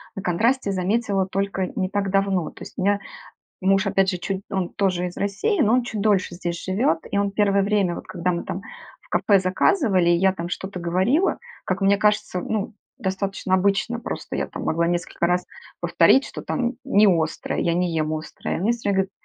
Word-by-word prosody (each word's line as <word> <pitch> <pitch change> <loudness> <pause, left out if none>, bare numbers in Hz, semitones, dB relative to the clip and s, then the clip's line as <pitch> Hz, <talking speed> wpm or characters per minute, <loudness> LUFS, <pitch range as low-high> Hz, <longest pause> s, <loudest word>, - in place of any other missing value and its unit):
на 195 - -4
контрасте 220 +6 +1
заметила 195 +1 0
только 195 -1 -1
не 185 -2 -1
так 200 0 -1
давно. 195 -4 +1
То - - -17
есть - - -10
у - - -2
меня 200 +1 +2 0.6
муж, 195 +2 +3
опять 195 -1 +2
же 185 - -2
чуть 190 +2 -3
он 190 -2 -1
тоже 185 -3 0
из 175 - -10
России, 205 - 0
но 220 -2 +3
он 250 - +2
чуть 220 -3 -4
дольше 200 -4 +1
здесь 175 -1 -4
живет, 185 -3 +1
и - - 0
он 200 0 +1
первое 200 -1 +2
время, 200 -4 +1
вот - - -8
когда 180 +1 -1
мы 170 -1 -2
там 195 - -5 0.4
в - - -25
кафе 200 - +3
заказывали, 185 - +2
и 175 - +4
я 190 +2 +3
там 170 -2 -5
что-то 190 +1 -5
говорила, 190 - +1 0.3
как 185 +1 -2
мне 200 +1 +4
кажется, 210 -2 +1
ну, 215 +2 -3 0.2
достаточно 195 -3 -2
обычно, 200 +5 +1
просто 235 - -5
я - - -1
там - - -7
могла 170 +1 +1
несколько 170 0 -1
раз 180 +1 +1 0.4
повторить, 270 - +4
что - - -7
там 245 -1 -1
не 215 -6 +4
острое, 165 -4 0
я 170 - +1
не 175 0 0
ем 155 -1 0
острое. 155 0 -4
Мне 205 +6 +2
всё 230 -3 -3
время 200 - +2
говорят: - - -38
195 Hz, 205 wpm, -23 LUFS, 180-205 Hz, 0.6 s, и